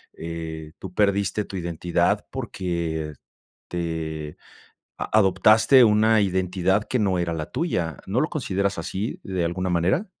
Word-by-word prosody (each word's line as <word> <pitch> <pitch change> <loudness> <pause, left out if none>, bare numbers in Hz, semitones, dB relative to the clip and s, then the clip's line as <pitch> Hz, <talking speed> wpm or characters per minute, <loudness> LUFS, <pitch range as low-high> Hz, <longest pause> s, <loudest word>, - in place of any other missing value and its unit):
eh, 80 -1 -6
tú 95 -1 -9
perdiste 100 0 +1
tu 95 - -7
identidad 85 0 0
porque 80 -4 -3 0.6
te 80 -3 -4 0.6
a - - -4
adoptaste 110 +6 +6
una 110 +1 +4
identidad 95 +1 +1
que 125 - -1
no 95 -3 +1
era 85 -1 -1
la 80 -1 -4
tuya, 90 - -2
¿no 110 +6 +1
lo 155 - +2
consideras 100 - -1
así 100 +4 -4
de 95 -4 -1
alguna 90 +2 -2
manera? 90 - +1
90 Hz, 135 wpm, -24 LUFS, 85-100 Hz, 0.6 s, adoptaste